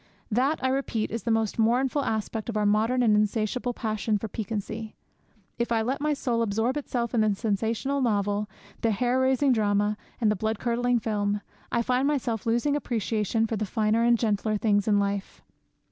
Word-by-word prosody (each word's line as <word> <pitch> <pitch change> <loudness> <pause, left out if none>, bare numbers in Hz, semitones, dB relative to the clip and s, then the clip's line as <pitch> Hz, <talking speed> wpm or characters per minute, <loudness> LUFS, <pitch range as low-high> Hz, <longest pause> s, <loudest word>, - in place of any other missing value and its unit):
That, 265 +8 +2
I 260 - +2
repeat, 260 -5 -1
is 230 - -3
the 235 - -3
most 225 -1 0
mournful 255 +5 +2
aspect 220 -1 -2
of 220 - -2
our 210 - +1
modern 220 +5 +2
and 215 -3 +4
insatiable 215 +4 0
passion 215 -1 -1
for 220 - -5
piquancy. 215 +1 -5 0.6
If 235 0 -1
I 225 -1 +2
let 265 +5 -2
my 300 0 +1
soul 240 -4 -1
absorb 225 +4 0
itself 245 -5 -2
in 230 - +3
the 215 -2 +2
sensational 225 +6 -1
novel, 205 -3 0 0.3
the 230 - +2
hair 245 +4 +1
raising 265 +1 +3
drama, 210 -2 +1 0.2
and 220 -3 +3
the - - +1
blood 220 +2 -1
curdling 245 +1 +1
film, 205 -2 -1 0.3
I 235 - +1
find 255 +3 +1
myself 235 -7 -1
losing 240 +6 +2
appreciation 225 -4 0
for 225 0 -2
the 215 - -1
finer 220 +2 +1
and 235 0 +4
gentler 215 -1 0
things 205 -1 +1
in 205 -1 +4
life. 200 -1 -2
225 Hz, 185 wpm, -26 LUFS, 210-245 Hz, 0.6 s, and